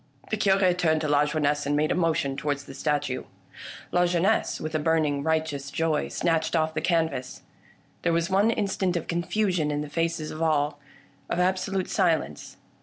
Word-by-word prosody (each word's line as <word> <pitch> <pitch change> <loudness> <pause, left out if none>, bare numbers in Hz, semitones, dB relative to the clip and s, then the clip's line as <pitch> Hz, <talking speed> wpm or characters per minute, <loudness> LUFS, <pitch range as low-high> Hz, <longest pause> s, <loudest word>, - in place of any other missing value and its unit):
The - - +2
Cure 195 -3 +3
turned 160 -3 +1
to 155 - -1
Lajeunesse 145 0 +1
and 145 - +1
made 155 +1 +1
a - - +3
motion 165 -6 0
towards 145 0 -2
the 135 - -11
statue. 145 -2 -1 0.7
Lajeunesse, 180 +3 +2
with 155 0 -5
a 155 - +1
burning 150 -2 +1
right 160 +1 +1
eous 140 -2 -6
joy, 155 +1 0
snatched 165 -1 0
off 160 -1 +1
the 155 - -2
canvas. 160 -6 -1 0.6
There 175 - +1
was 165 0 +1
one 195 +3 +3
in 220 -2 +1
stant 190 -2 -1
of 165 - -4
confusion 175 -1 0
in 145 0 -1
the 150 - -6
faces 165 0 -2
of 155 - -7
all 150 -2 +1 0.3
— - - -33
of - - -1
absolute 185 +1 0
silence. 165 - -1
160 Hz, 180 wpm, -26 LUFS, 150-175 Hz, 0.7 s, Cure